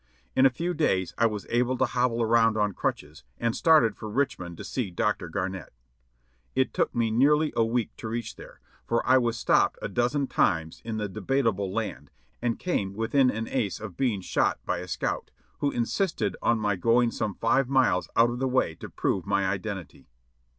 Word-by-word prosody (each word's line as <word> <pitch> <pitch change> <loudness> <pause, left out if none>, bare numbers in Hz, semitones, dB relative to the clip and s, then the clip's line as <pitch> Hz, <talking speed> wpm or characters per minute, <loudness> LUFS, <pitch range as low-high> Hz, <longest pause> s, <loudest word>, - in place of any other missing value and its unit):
In 130 +1 +6
a - - +3
few 170 +8 -3
days 95 - 0
I 115 - +5
was 105 -2 -5
able 125 +2 +1
to 130 - +3
hobble 120 -1 0
around 115 -1 +3
on 105 -1 +1
crutches, 75 -3 -4 0.2
and 115 -1 0
started 150 -10 +4
for 110 - -7
Richmond 105 -9 -2
to - - -7
see 125 -7 -3
Dr. 95 -1 -1
Garnett. 95 -2 -4 0.8
It 130 0 +1
took - - 0
me 115 -2 +1
nearly 150 +6 +3
a 115 - +3
week 115 0 -1
to - - -6
reach 115 +1 -4
there, - - -13 0.3
for 115 - 0
I 130 - +5
was 120 -2 -1
stopped - - +2
a - - -3
dozen 125 +4 0
times 80 -9 0
in 110 -1 -4
the 105 -1 -2
"Debatable 105 -1 -1
Land," 70 -5 -4 0.3
and 120 -1 0
came 100 - -2
within 125 +4 +2
an 115 -1 -3
ace 115 -7 -1
of 105 -5 -8
being 120 -8 0
shot - - +1
by - - -1
a 90 - -7
scout, - - -3 0.3
who 145 - +1
insisted 155 - -1
on 120 - +2
my 105 -2 0
going 115 +5 +3
some 105 -4 -3
five 125 +3 +1
miles 130 -9 +2
out 115 +1 +5
of 120 - -5
the 130 - 0
way 130 -10 +1
to - - -10
prove 95 0 -1
my 100 -1 +1
identity. 95 -3 -5
115 Hz, 195 wpm, -27 LUFS, 100-125 Hz, 0.8 s, In